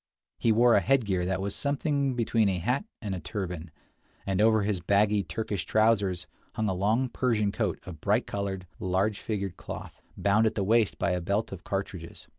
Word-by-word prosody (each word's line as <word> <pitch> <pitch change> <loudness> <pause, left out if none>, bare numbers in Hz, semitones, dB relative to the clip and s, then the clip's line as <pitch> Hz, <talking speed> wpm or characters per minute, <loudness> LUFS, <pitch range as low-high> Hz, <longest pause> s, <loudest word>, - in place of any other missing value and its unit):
He 115 - +3
wore 120 +2 +5
a - - +6
headgear 100 -10 +1
that 95 0 -1
was 100 0 -2
something 140 -2 0
between 115 -3 +2
a 95 - 0
hat 125 - 0 0.2
and 100 -2 -2
a 95 - -3
turban, 90 -4 -5 0.6
and 95 0 0
over 110 -1 +4
his 100 -2 0
baggy 100 +4 +3
Turkish 105 -3 -3
trousers 100 -5 +2 0.3
hung 110 - 0
a 95 - +1
long 110 +8 +1
Persian 115 -5 +1
coat - - -1
of 80 -4 -9
bright - - +2
colored, 95 -2 -3
large 95 +3 0
figured 100 -4 -3
cloth, - - -8 0.2
bound 105 +3 +3
at - - -2
the 100 - 0
waist 110 +1 +2
by - - 0
a 90 0 0
belt 100 +5 -1
of 95 -3 -8
cartridges. 95 -4 -5
100 Hz, 190 wpm, -28 LUFS, 95-110 Hz, 0.6 s, a